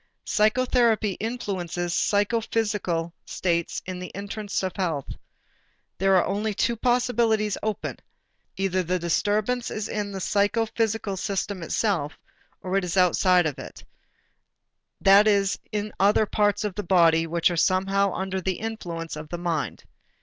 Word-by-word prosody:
Psychotherapy 225 -1 +2
influences 180 -7 -3
psychophysical 205 -5 0
states 170 -2 -2
in 185 -1 -5
the 180 - -6
interest 200 0 -4
of 185 -2 -3
health. 165 -8 -2 0.9
There 195 +1 +4
are 180 - +4
only 205 +2 -1
two 235 - +1
possibilities 235 -3 +1
open: 215 -1 -3 0.6
either 190 -1 0
the 180 +1 -1
disturbance 210 +8 0
is 215 - -4
in 205 -1 -3
the 195 - -5
psychophysical 215 +1 0
system 195 0 -3
itself 170 -4 -1 0.5
or 185 +1 0
it 195 - 0
is 180 +1 -3
outside 180 0 +4
of 150 -4 -2
it, - - -10 1.1
that 200 +2 +6
is 200 -2 +2
in 210 0 -2
the - - -18
other 205 +3 +4
parts 205 0 +1
of 210 -2 -2
the 210 - -3
body 165 -3 +4
which 170 +2 +2
are - - -2
somehow 195 +3 +2
under 190 0 -3
the 190 +1 0
influence 175 -8 -5
of 155 0 -8
the 175 - -4
mind. 170 -4 -3
195 Hz, 140 wpm, -25 LUFS, 180-215 Hz, 1.1 s, that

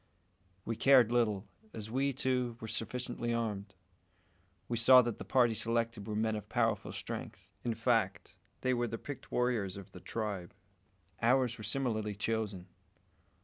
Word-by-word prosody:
We 115 - -2
cared 125 -2 +6
little, 110 -4 +1 0.3
as 110 0 -7
we, 135 +3 +1
too, 125 -3 -1
were 110 - -6
sufficiently 120 +1 -2
armed. 105 -3 -3 0.9
We 120 - -1
saw 125 +2 +8
that 120 -2 -3
the - - -5
party 125 -3 +3
selected 115 -1 -1
were 105 - -3
men 110 0 +1
of 105 -1 -6
powerful 115 -2 +1
strength; - - -6
in 120 -2 -1
fact, 115 -4 0 0.3
they 130 - +2
were 120 -1 0
the 115 0 -4
picked 145 +2 -8
warriors 115 -6 0
of 100 - -10
the 90 - -10
tribe. 100 -2 -4 0.7
Ours 125 0 +3
were - - -7
similarly 110 -3 -1
chosen. 105 -3 -2
115 Hz, 150 wpm, -33 LUFS, 105-125 Hz, 0.9 s, saw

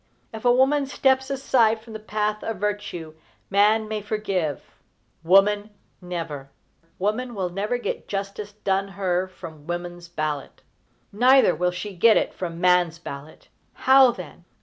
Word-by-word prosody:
If 220 +2 -8
a 245 - +6
woman 270 +3 +3
steps 265 0 +1
aside 250 -5 +2
from 225 0 -13
the 220 - -6
path 210 0 -2
of 225 - -3
virtue, 200 -5 -4 0.4
man 215 +2 +3
may 215 -1 -3
forgive, 195 -8 -2 0.6
woman 205 +4 +4 0.3
never! 165 -6 -6 0.5
Woman 225 +5 -2
will 185 -3 -2
never 205 +7 -2
get 245 - -5
justice 200 +1 -5
done 195 -1 -1
her 185 -1 0
from 160 -5 -12
woman's 175 0 -5
ballot. 155 -4 -4 0.5
Neither 250 -1 +5
will 180 +3 0
she 185 +3 -6
get 220 +5 +5
it - - 0
from 170 -2 -5
man's 180 -2 +3
ballot. 150 -2 -10 0.4
How, 265 -1 +8
then? 180 -6 -8
200 Hz, 145 wpm, -24 LUFS, 175-220 Hz, 0.6 s, How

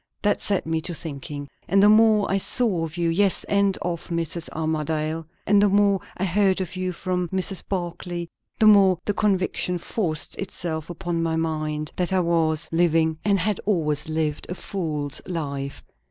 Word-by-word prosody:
"That 205 - +2
set 200 -3 0
me 160 0 -1
to 170 +1 -3
thinking; 145 -2 -6 0.2
and 195 +2 +4
the - - +8
more 215 -1 +5
I 195 - +1
saw 195 -6 +1
of 160 +2 -8
you, 170 -1 +1
yes, 190 +3 +2
and 200 -1 +2
of 170 -1 -3
Mrs. 170 -1 -2
Armadale, 155 0 -2 0.2
and 205 0 +4
the 205 - +4
more 200 0 +3 0.2
I 190 - 0
heard 195 +1 +2
of 185 -1 -4
you 185 0 -2
from 180 0 -2
Mrs. 190 +1 -1
Barclay, 175 -2 -3 0.3
the 220 - +3
more 200 -4 +6
the 205 - 0
conviction 190 -3 0
forced 170 -3 -1
itself 170 -5 -4
upon 170 0 -3
my 165 -1 0
mind, 155 -2 -2
that 180 0 0
I 190 - +3
was 165 -2 +1
living, 165 -1 +2
and 200 -1 +3
had 195 +2 0
always 155 -7 0
lived, 155 -1 -1
a 180 - -3
fool's 155 -8 -3
life. 140 -5 -4
175 Hz, 175 wpm, -24 LUFS, 160-195 Hz, 0.3 s, the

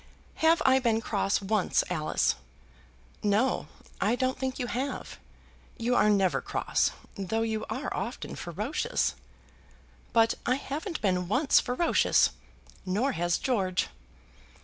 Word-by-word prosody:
Have 325 +1 +4
I 265 0 +6
been 230 -3 +2
cross 200 -3 0
once, 200 -1 +2
Alice?" 155 -4 +1 0.9
"No; 210 +6 +1 0.4
I 235 - +3
don't 255 +1 0
think 260 0 -2
you 250 - -2
have. 255 +3 -4 0.6
You 240 +2 0
are 210 - +4
never 195 -3 +2
cross, - - 0 0.3
though 210 +3 -1
you 220 -1 -2
are 255 +7 -3
often 215 +7 -4
ferocious." 225 - -1 1.0
"But 225 -1 +4
I 255 - +2
haven't 305 +6 -4
been 180 -3 +1
once 260 - +4
ferocious, 250 +8 +3 0.5
nor 210 +9 0
has 175 -5 0
George." 195 -8 0
225 Hz, 125 wpm, -28 LUFS, 195-260 Hz, 1.0 s, I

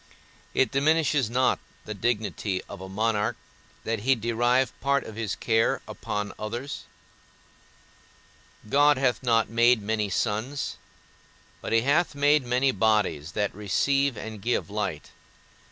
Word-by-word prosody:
It 130 - +3
diminishes 145 -3 +2
not 125 +2 +2 0.3
the 110 - -5
dignity 105 -3 -1
of - - -9
a 95 - -8
monarch 105 +1 0 0.5
that 115 -1 -2
he 130 +5 +3
derive 120 +3 +1
part 140 +1 +1
of 110 - -9
his 110 -3 -3
care 115 -1 +1
upon 105 -1 -4
others; 120 +6 -5 1.8
God 145 +4 +4
hath 130 -3 +1
not 115 -3 +2
made 120 +1 +4
many 105 0 -1
suns, 115 +8 -2 0.8
but - - -5
he 115 0 +4
hath 145 +5 +1
made 145 0 +3
many 125 +2 +2
bodies 105 - +1
that 105 -1 -1
receive 135 +6 +1
and 110 -1 -7
give 115 -1 -1
light. 100 -8 -3
115 Hz, 130 wpm, -26 LUFS, 105-130 Hz, 1.8 s, God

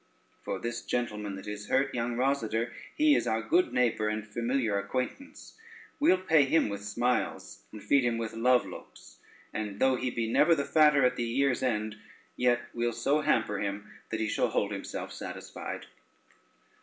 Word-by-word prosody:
For - - -3
this 120 0 -4
gentleman 105 -5 -2
that 95 - -9
is 105 0 -6
hurt, 135 +1 +1
young 120 0 -1
Rosader, 120 -3 0 0.2
he 305 -1 +5
is - - +1
our 110 0 0
good 170 +7 +2
neighbor 120 -3 +1
and 105 0 -3
familiar 115 -1 0
acquaintance; 125 - -5 0.5
we'll 280 -10 +5
pay 160 -6 +4
him 145 -3 +2
with 100 0 -5
smiles, 120 +4 -1
and 105 - -10
feed 140 -2 +3
him 120 -1 +1
with 115 -1 -4
love 125 +2 +3
looks, - - -12 0.3
and 105 -2 -4
though 130 -1 +3
he 125 - -1
be 115 -2 -2
never 155 +8 +4
the 140 -2 -1
fatter 150 -4 +5
at 125 0 +1
the 120 - -1
year's 125 +2 +1
end, 110 -4 -1 0.4
yet 120 -1 +2
we'll 120 0 -1
so 140 +6 +1
hamper 110 -8 +1
him 105 +1 -4 0.2
that 110 - -3
he 110 - 0
shall - - +1
hold - - 0
himself - - -5
satisfied." - - -7
120 Hz, 175 wpm, -29 LUFS, 110-135 Hz, 0.5 s, he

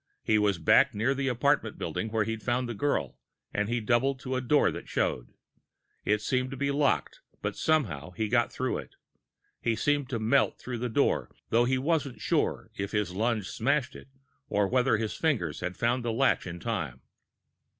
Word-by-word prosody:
He 110 -1 +3
was 100 -3 +2
back 80 - +4
near 115 +6 +2
the 135 0 -2
apartment 125 -2 +1
building 110 - -3
where 110 0 +1
he'd 110 +1 -4
found 125 +1 0
the 120 - -3
girl, 145 +7 -1 0.3
and 105 +1 0
he 120 0 +1
doubled 125 +4 +1
to 130 0 -3
a 130 - 0
door 145 +4 +3
that - - -8
showed. - - -1 0.7
It 105 0 +1
seemed 130 +2 0
to 135 - -6
be 140 +1 0
locked, 140 -1 +1 0.2
but - - -2
somehow, 100 - 0
he 110 +4 -2
got 120 +2 +2
through 130 0 -2
it. - - -11 0.7
He 115 -1 +1
seemed 145 +3 0
to 125 - -1
melt 115 +5 +2
through 125 -2 -5
the 125 +1 -2
door, 110 - +1 0.2
though 120 +1 +4
he 130 +1 +2
wasn't 140 -1 0
sure - - 0
whether 100 +1 -1
his 100 -4 -1
lunge 110 0 0
smashed 140 +3 0
it - - -11 0.4
or 100 -1 +2
whether 125 0 +3
his 110 -1 -2
fingers 115 - 0
had 90 0 -4
found 120 +1 +1
the 120 - -1
latch 125 -3 +2
in 85 0 -6
time. 80 - -3
120 Hz, 190 wpm, -29 LUFS, 105-130 Hz, 0.7 s, back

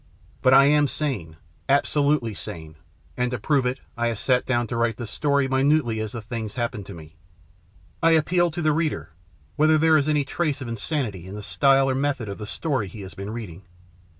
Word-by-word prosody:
But 130 +1 +5
I 135 0 +8
am 145 0 +4
sane, 125 - -3 0.3
absolutely 140 -3 +2
sane, 80 -4 -8 0.4
and 125 0 0
to 125 - -3
prove 135 +3 +1
it 130 +2 -2 0.2
I 120 0 0
have 115 -2 -2
sat 125 +4 +1
down 120 -2 +1
to 120 - -5
write 115 -2 0
this 120 -3 -6
story 140 -2 +1
minutely 130 -3 +2
as 110 -1 -4
the 115 -3 -6
things 110 -2 -5
happened 120 -4 -3
to 100 - -8
me. 80 -1 -13 0.8
I 165 0 +5
appeal 175 +2 +3
to 170 +1 -4
the 155 -1 +3
reader, 160 - -2 0.5
whether 155 +1 +4
there 160 0 +5
is 150 0 +1
any 150 -2 +2
trace 150 0 -1
of 130 - -6
insanity 115 - -3
in 95 - -8
the 105 - -7
style 135 +3 +3
or 135 - +1
method 135 -4 -1
of 100 - -6
the 105 - -6
story 135 -3 -2
he 105 +3 -10
has 95 -1 -8
been 100 +1 -7
reading. 105 -6 -7
130 Hz, 205 wpm, -24 LUFS, 110-145 Hz, 0.8 s, I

